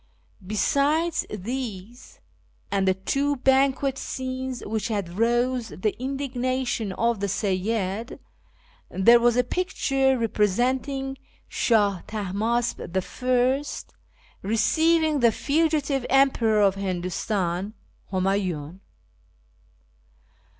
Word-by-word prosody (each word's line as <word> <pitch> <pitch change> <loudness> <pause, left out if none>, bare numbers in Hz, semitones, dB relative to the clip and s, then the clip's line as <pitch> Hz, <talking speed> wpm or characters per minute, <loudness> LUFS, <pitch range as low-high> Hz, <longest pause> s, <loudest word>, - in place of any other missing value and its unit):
Besides 285 - +1
these, 225 +1 -6 0.5
and 195 -1 +1
the 190 - +3
two 280 +9 0
banquet 270 +1 +2
scenes 260 -1 -4
which 220 +1 -2
had 200 -4 -3
roused 240 -3 0
the 215 - +1
indignation 255 -4 -2
of 230 +1 0
the 200 - -1
Seyyid, 200 +2 -2 0.7
there 235 +6 +5
was 240 0 +3
a 250 - +4
picture 270 -4 0
representing 255 +5 0 0.3
Shah 205 -6 +2
Tahmasp 220 +3 -1
I 250 +8 0 0.8
receiving 310 +9 +2
the 235 -2 +5
fugitive 290 -1 0
emperor 245 -6 +3
of 200 -2 +4
Hindustan, 185 +1 -2 0.4
Humayiin. 185 -4 -1
235 Hz, 85 wpm, -25 LUFS, 200-265 Hz, 0.8 s, there